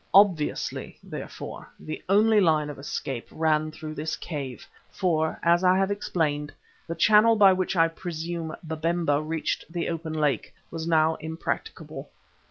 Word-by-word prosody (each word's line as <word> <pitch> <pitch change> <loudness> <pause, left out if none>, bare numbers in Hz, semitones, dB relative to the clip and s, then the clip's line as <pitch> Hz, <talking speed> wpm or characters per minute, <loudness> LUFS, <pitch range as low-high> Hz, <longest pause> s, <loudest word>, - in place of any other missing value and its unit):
Obviously, 185 -7 +2
therefore, - - -8
the 155 - -6
only 210 +2 +5
line 155 -4 +2
of 140 - -11
escape 135 -3 -4
ran 155 -1 +1
through 155 0 -7
this 155 +1 -3
cave, 140 -6 -6 0.2
for, 160 -4 0
as 170 +1 +4
I 185 0 +5
have 195 +1 +1
explained, 155 -7 -1 0.4
the 165 - -3
channel 215 +4 +6
by 200 -3 +7
which 185 +1 -1
I 165 -1 +5
presume 165 -1 -5
Babemba 160 -1 0
reached 160 +1 -3
the 170 -1 -2
open 165 -1 -4
lake, 150 -3 0 0.2
was 165 0 -4
now 160 -1 +3
impracticable. 160 +1 -5
160 Hz, 145 wpm, -26 LUFS, 155-180 Hz, 0.4 s, by